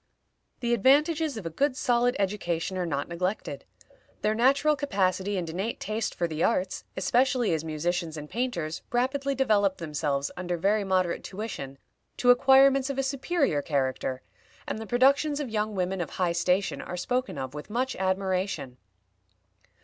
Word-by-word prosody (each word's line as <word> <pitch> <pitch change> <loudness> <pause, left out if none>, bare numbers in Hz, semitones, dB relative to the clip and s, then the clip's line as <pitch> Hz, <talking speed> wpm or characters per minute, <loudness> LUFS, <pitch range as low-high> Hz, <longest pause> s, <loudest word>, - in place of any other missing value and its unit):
The 240 -1 +1
advantages 290 - +3
of 205 - -7
a 165 - -3
good 270 - 0
solid 245 +1 +2
education 190 -3 -1
are 180 -1 -1
not 140 -3 -2
neglected; 180 +5 -3 0.6
their 215 - +2
natural 275 +6 +3
capacity 195 -7 0
and 175 -2 -2
innate 190 +8 -3
taste 215 +1 -3
for 170 - 0
the 155 0 -2
arts, 185 -5 0
especially 245 +1 +2
as 160 -1 -1
musicians 160 +1 -2
and 150 0 -7
painters, 175 -9 -3
rapidly 270 +3 0
develop 205 -7 +2
themselves, 145 -3 -2
under 180 -1 -3
very 205 +5 +2
moderate 185 -3 0
tuition, 185 -10 -6 0.4
to 245 - +5
acquirements 270 +1 +5
of 275 - -3
a 270 - +1
superior 275 - 0
character, 130 -2 -1 0.4
and - - -3
the 220 - -7
productions 280 +5 +3
of 275 -6 -4
young 215 -1 -1
women 185 0 -1
of 175 - -3
high 180 -2 0
station 180 +3 0
are 180 - -6
spoken 245 - -2
of 130 -1 -5
with 150 +5 -8
much 255 +4 -1
admiration. 185 -8 -1
195 Hz, 155 wpm, -27 LUFS, 170-255 Hz, 0.6 s, to